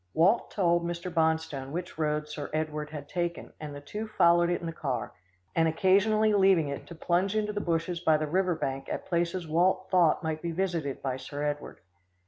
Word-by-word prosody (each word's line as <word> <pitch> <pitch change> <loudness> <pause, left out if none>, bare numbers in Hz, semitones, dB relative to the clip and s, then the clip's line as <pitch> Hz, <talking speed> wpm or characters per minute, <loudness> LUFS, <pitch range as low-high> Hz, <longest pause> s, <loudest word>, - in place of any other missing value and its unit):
Walt 190 +9 +3
told 175 -3 +2
Mr. 170 +1 -4
Bonstone 160 -5 0
which 175 +3 -5
road 150 -1 0
Sir 150 -1 -6
Edward 155 -1 -2
had 150 -2 -7
taken, 175 0 -3
and 150 -2 -7
the 145 - -8
two 210 +10 -5
followed 175 -4 +4
it 175 - 0
in - - -7
the 165 - -3
car, 135 -6 -3 0.4
and 165 -1 +4
occasionally 200 +6 +3
leaving 190 -6 +4
it 140 - -6
to 170 - -9
plunge 180 +5 0
into 210 -1 0
the 205 - -2
bushes 170 0 -1
by 160 -2 +3
the 155 - -1
river 180 +3 +1
bank 135 -2 -3
at - - -4
places 170 0 -1
Walt 185 +4 +2
thought 175 -4 +4
might 160 -1 -2
be 170 - -3
visited 170 -6 -2
by 130 -1 -1
Sir 145 +3 -6
Edward. 145 -8 -4
170 Hz, 200 wpm, -29 LUFS, 150-185 Hz, 0.4 s, followed